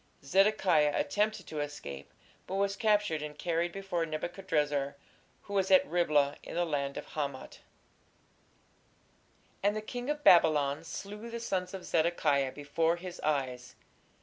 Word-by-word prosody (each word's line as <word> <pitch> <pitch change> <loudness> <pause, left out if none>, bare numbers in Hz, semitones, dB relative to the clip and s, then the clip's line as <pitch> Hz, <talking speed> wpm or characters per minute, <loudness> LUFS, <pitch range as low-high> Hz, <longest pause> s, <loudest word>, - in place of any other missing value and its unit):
Zedekiah 185 -4 +3
attempted 210 -2 0
to 155 - -5
escape, 70 - -6 0.4
but 190 - -4
was 200 0 +1
captured 205 -6 +2
and 150 -1 -6
carried 170 +1 -1
before 190 -3 -2
Nebuchadrezzar, 155 -4 -1 0.5
who 200 - -9
was 195 -1 +1
at 280 0 +6
Riblah, 150 - +2
in - - -8
the 175 0 +1
land 140 -3 -2
of - - -7
Hamath. 140 -3 -5 2.0
And 205 +1 +2
the - - -1
king 245 +4 -5
of 295 0 -2
Babylon 150 -4 +5
slew 200 +7 -7
the 235 0 -5
sons 185 -4 -2
of 185 - -8
Zedekiah 155 -5 +2
before 155 +4 0
his 180 +1 -8
eyes.... 130 -4 -2
170 Hz, 140 wpm, -31 LUFS, 145-195 Hz, 2.0 s, at